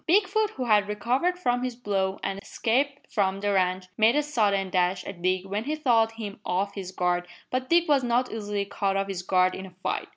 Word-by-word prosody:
Bigfoot, 420 +3 +3
who 255 - -3
had 210 -3 +4
recovered 255 - 0
from 245 -8 0
his 250 -1 -3
blow 195 -5 -1
and 195 0 -3
escaped 275 +8 -1
from 195 -2 +1
the 205 0 0
ranch, 185 -1 +1
made 220 +4 +5
a 295 - +3
sudden 200 -9 +1
dash 180 0 +1
at 190 -3 -8
Dick 185 +1 +1
when 205 +3 -3
he 300 +2 -1
thought 230 -7 +2
him 215 -3 -7
off 195 +3 -1
his 190 -2 -6
guard, 175 -1 0 0.2
but 255 0 -2
Dick 340 0 +4
was 285 -3 +3
not 245 +1 +1
easily 205 -2 -3
caught 195 -1 -1
off 195 - 0
his 190 -2 -4
guard 185 0 +2
in 190 0 -6
a - - -14
fight. - - -2
205 Hz, 220 wpm, -26 LUFS, 190-255 Hz, 0.2 s, made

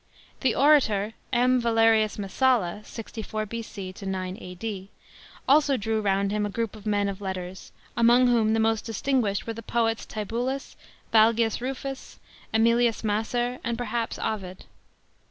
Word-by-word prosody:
The 260 -4 +1
orator 225 -8 +4 0.2
M. 250 +1 +3
VALERIUS 225 -2 +3
MESSALLA 210 -1 +1
(64 220 -1 -6
B.C. 210 -4 -6
9 190 -1 -3
A.D.), 190 +1 -6 0.6
also 285 -1 +4
drew 220 0 -1
round 200 -1 +1
him 210 0 0
a 205 - -1
group" 230 +1 -3
of 215 0 -10
men 205 -1 +1
of 200 0 -5
letters, 185 -1 -6 0.2
among 240 +2 +5
whom 230 -3 +3
the - - +1
most 225 -1 +1
distinguished 225 -3 0
were 230 - -3
the 230 - -8
poets 225 0 -1
Tibullus, 240 +6 -3 0.4
Valgius 225 +1 +4
Rufus, 270 +1 -5 0.3
JSmilius 230 +1 +3
Macer, 240 +4 -1
and 235 0 -2
perhaps 235 -1 -2
Ovid. 185 -4 -4
225 Hz, 135 wpm, -26 LUFS, 205-240 Hz, 0.6 s, among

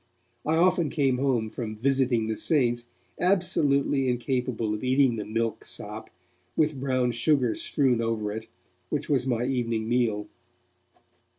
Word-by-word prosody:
I 160 - +3
often 175 -1 +3
came 135 -4 +1
home 130 -5 +1
from 110 -1 -5
'visiting 130 -1 +1
the 110 0 -2
saints' 120 -5 +1 0.3
absolutely 145 -8 +2
incapable 125 -3 -1
of 105 - -5
eating 130 -1 +3
the 105 - -4
milk 115 +1 -2
sop, 105 +2 -6 0.5
with 150 -3 +1
brown 130 -2 +1
sugar 125 0 +2
strewn 130 -5 +1
over 110 -2 -1
it, 110 +1 -6 0.4
which 150 -1 -2
was 135 -3 +1
my 120 -1 0
evening 115 -4 -1
meal. 115 -4 +1
125 Hz, 135 wpm, -27 LUFS, 115-140 Hz, 0.5 s, I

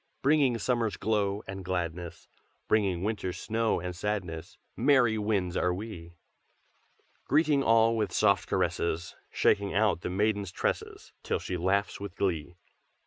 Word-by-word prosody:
Bringing 140 -4 +3
summer's 115 -1 0
glow 105 -2 0
and 95 0 -6
gladness, 85 -2 -4 0.4
Bringing 95 -5 +1
winter's 100 -4 -2
snow 115 0 0
and 90 +1 -5
sadness, 90 -5 -4 0.2
Merry 125 -3 +4
winds 100 -4 0
are 90 - +2
we! 90 -3 -7 1.1
"Greeting 150 -1 +3
all 115 -2 +4
with 105 -4 -1
soft 100 -2 +2
caresses, 85 +1 -1
Shaking 100 -1 +1
out 105 -4 +2
the - - -3
maiden's 100 0 0
tresses - - -3
Till - - -1
she 90 - -4
laughs 95 +3 0
with 100 -2 -7
glee. 85 -4 -2
100 Hz, 135 wpm, -29 LUFS, 90-110 Hz, 1.1 s, Merry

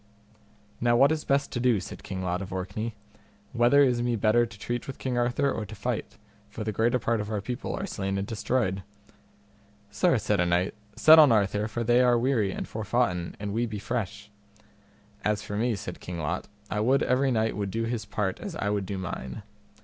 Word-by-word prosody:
Now 120 0 +3
what 140 +5 +5
is 155 -1 -1
best 140 +1 +1
to 120 - -2
do? 120 -4 +3
said 90 - -8
King 95 -1 -5
Lot 90 +1 -1
of 95 - -7
Orkney; 100 +5 -4 0.6
whether 125 +4 +5
is 125 -3 +2
me 120 0 +1
better 115 +2 +3
to 110 -2 -13
treat 120 +3 -4
with 135 - -6
King 130 -2 -3
Arthur 120 +3 +1
or 110 - -3
to 105 +1 -9
fight, 115 +1 -4 0.3
for 110 +1 -6
the 110 - -2
greater 115 +4 +2
part 115 -2 0
of 105 - -5
our 105 -2 -1
people 120 +6 -4
are 195 - -3
slain 95 - -3
and 95 - -2
destroyed? 105 -3 -1 1.1
Sir, 105 +4 +3
said 105 -2 0
a 90 - +3
knight, 90 +2 +1 0.2
set 160 +1 +8
on 150 -5 +8
Arthur 105 -1 +2
for 115 +2 -3
they 120 +2 +4
are 125 -1 +4
weary 115 -5 +1
and - - -5
forfoughten 105 -5 -1
and 100 0 -4
we 120 +2 0
be 110 -2 -5
fresh. 105 -1 -4 0.9
As 105 0 0
for 105 - -5
me, 115 +2 +1
said 90 -2 -7
King 90 -1 -6
Lot, 75 -2 -3 0.2
I 105 - 0
would 130 +6 +3
every 130 +2 +2
knight 110 -2 +1
would 100 -1 -2
do 115 +4 -2
his 115 -1 -2
part 95 -4 -2
as 195 -5 -6
I 105 -7 -1
would 100 -2 -1
do 100 - -3
mine. 65 -8 -5
110 Hz, 210 wpm, -27 LUFS, 100-120 Hz, 1.1 s, set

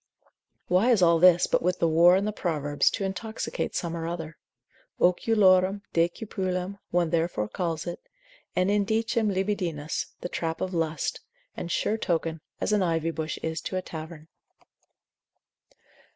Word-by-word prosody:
Why 185 +7 +3
is 220 -7 +4
all 170 -1 +5
this, 175 0 +6
but - - +1
with 180 +2 0
the 170 - +2
whore 170 +3 +6
in 195 - 0
the 215 - 0
Proverbs, 150 -7 0
to 205 - -3
intoxicate 220 +3 -4
some 170 -1 -2
or 165 -1 -4
other? 165 -2 -5 0.6
oculorum 190 0 +3
decipulam, 185 +2 -1
one 175 -2 +1
therefore 165 -11 0
calls 165 - -3
it, 175 - -5 0.6
et 185 - +2
indicem 220 +2 +1
libidinis, 185 -6 -2
the - - -3
trap 165 -2 -3
of 185 0 -3
lust, 160 -2 -1 0.4
and 170 - -5
sure 220 +6 0
token, 165 -3 -1 0.2
as - - 0
an 210 - +3
ivy 165 -2 0
bush 160 -1 -4
is 160 -1 -2
to 185 - -3
a 185 - -3
tavern. 160 -1 -8
175 Hz, 150 wpm, -27 LUFS, 165-195 Hz, 0.6 s, this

